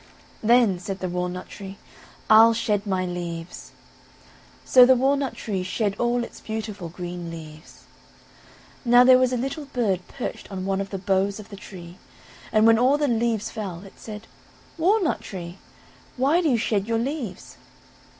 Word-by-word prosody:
"Then," 225 -5 +4
said 190 +2 -5
the 185 - -4
walnut 180 +1 -3
tree, 195 -1 -9 0.5
"I'll 225 +1 +7
shed 210 -2 -1
my 185 -2 0
leaves," 175 -1 -6 0.9
so 255 - +7
the 260 +1 +6
walnut 270 +1 +1
tree 195 -4 -3
shed 200 +2 -1
all 240 0 +1
its - - -10
beautiful 215 -5 -5
green 175 0 -6
leaves. 155 -1 -11 1.0
Now 245 0 +6
there 255 0 +7
was 255 -1 +2
a 250 - 0
little 270 +5 -4
bird 220 -9 -1
perched 245 - -7
on 190 -1 -4
one 195 0 0
of 195 - -5
the 195 - -4
boughs 195 +2 0
of 215 - -11
the 200 - -9
tree, 180 -3 -11 0.5
and 215 0 +4
when 225 0 +6
all 260 +4 +4
the 295 -1 +1
leaves 230 -3 0
fell, 190 -5 -6
it 195 - -15
said: 215 0 -9 0.5
"Walnut 360 +1 +1
tree, 175 -1 -8 0.6
why 285 +7 +3
do 325 - +1
you 245 - +3
shed 210 -2 0
your 230 0 +1
leaves?" 240 - -5
210 Hz, 165 wpm, -24 LUFS, 185-245 Hz, 1.0 s, I'll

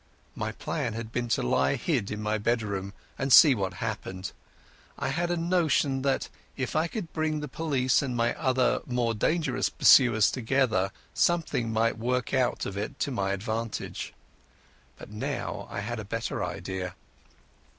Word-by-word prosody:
My 110 0 -3
plan 120 +1 -3
had 115 0 -6
been 120 +1 -2
to 115 - +1
lie 65 +2 +2
hid 130 - -1
in 105 0 -4
my 110 +1 0
bedroom, 105 -3 -1 0.3
and 135 0 -1
see 145 +2 +9
what 95 -5 -2
happened. 100 -4 -4 0.7
I - - -2
had 175 +1 -1
a 175 - 0
notion 160 -6 +1
that, 135 0 0 0.3
if 130 -2 -3
I 155 +2 +2
could 175 -2 -6
bring 155 -1 0
the 150 - -4
police 135 -3 +1
and 130 -3 -3
my 120 0 +2
other 130 -3 +1
more 125 -2 0
dangerous 160 +9 0
pursuers 120 -5 +6
together, 115 -6 +1 0.2
something 160 -9 +1
might 115 +1 +1
work 125 +3 -1
out 130 -2 +1
of 100 - -5
it 120 +7 -4
to 140 - 0
my 100 -5 -1
advantage. 110 +3 -4 0.8
But - - -11
now 105 - -4
I - - -4
had 120 +2 -4
a - - -4
better 115 +3 -3
idea. 95 -2 -4
120 Hz, 160 wpm, -28 LUFS, 105-140 Hz, 0.8 s, see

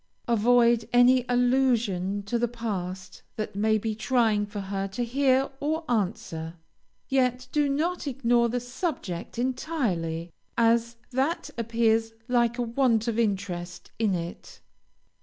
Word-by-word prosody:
Avoid 235 0 +3
any 245 +1 +5
allusion 240 -6 +1
to 235 +4 -1
the 240 - +2
past 190 -6 -5
that 215 -1 -4
may 215 +2 +2
be 220 +1 -2
trying 220 -2 +1
for 205 0 -6
her 195 0 -3
to 195 +5 -3
hear 265 +2 +2
or 315 +3 -1
answer, 185 -7 -2 0.5
yet 255 -1 +1
do 295 -1 +2
not 320 +4 -1
ignore 240 -3 +2
the 245 +2 -1
subject 245 - -4
entirely, 215 - -2 0.3
as 235 0 +3 0.2
that 270 +7 -1
appears 225 -1 +1
like 240 -1 +2
a 245 - 0
want 235 -1 +1
of 230 -1 0
interest 185 -5 -2
in 210 -4 +2
it. 170 0 -7
235 Hz, 130 wpm, -27 LUFS, 205-250 Hz, 0.5 s, any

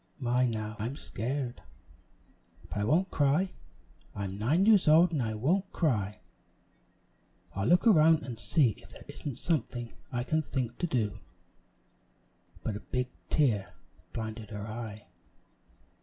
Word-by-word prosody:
"My, 125 -2 +2
now 110 -1 -3
I 110 - -1
am 130 - -5
scared! 130 -1 -3 1.1
but 105 - -3
I - - +1
won't 170 - +2
cry! 150 +7 +2 0.6
I'm 100 -1 -4
nine 150 - +3
years 210 -5 +5
old, 165 +3 +7
and 150 -5 0
I 110 -2 -1
won't 180 - +1
cry! 105 - 0 1.3
I'll 100 +2 -1
look 180 +4 +4
around 160 -7 +6
and 120 -4 -6
see 145 -2 +3
if - - -16
there - - -13
isn't 140 -5 -6
something 120 -7 -2 0.2
I 120 -1 -1
can 155 +5 +1
think 125 -5 -3
to 175 - 0
do," 110 - -1 1.4
but 110 - -2
a - - -4
big 125 +2 -2 0.2
tear 105 - +1 0.4
blinded 110 -1 -5
her 105 -1 -5
eye. 110 -1 -6
125 Hz, 140 wpm, -30 LUFS, 110-155 Hz, 1.4 s, old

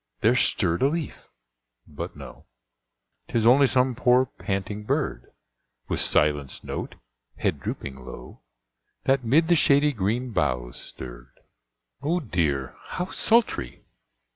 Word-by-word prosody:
there 115 +4 +4
stirred 85 -8 +1
a 135 - +5
leaf, 160 0 -4 0.6
but 75 - -7
no, - - -12 0.8
Tis 115 -1 0
only 135 +4 +6
some 130 0 +2
poor, 125 +1 +4
panting 100 -1 -4
bird, 80 - -2 0.6
With - - 0
silenced 75 -3 +2
note, - - -5 0.4
head - - -1
drooping 65 -2 -6
low, 60 0 -11 0.6
That 135 -1 +2
'mid 150 +8 +3
the 175 - +5
shady 145 -2 +4
green 115 +4 -1
boughs 65 - -1
stirred. - - -10 0.6
Oh 165 +5 0
dear! 80 - -1
how 180 +1 -4
sultry! 225 - +1
110 Hz, 120 wpm, -25 LUFS, -, 0.8 s, only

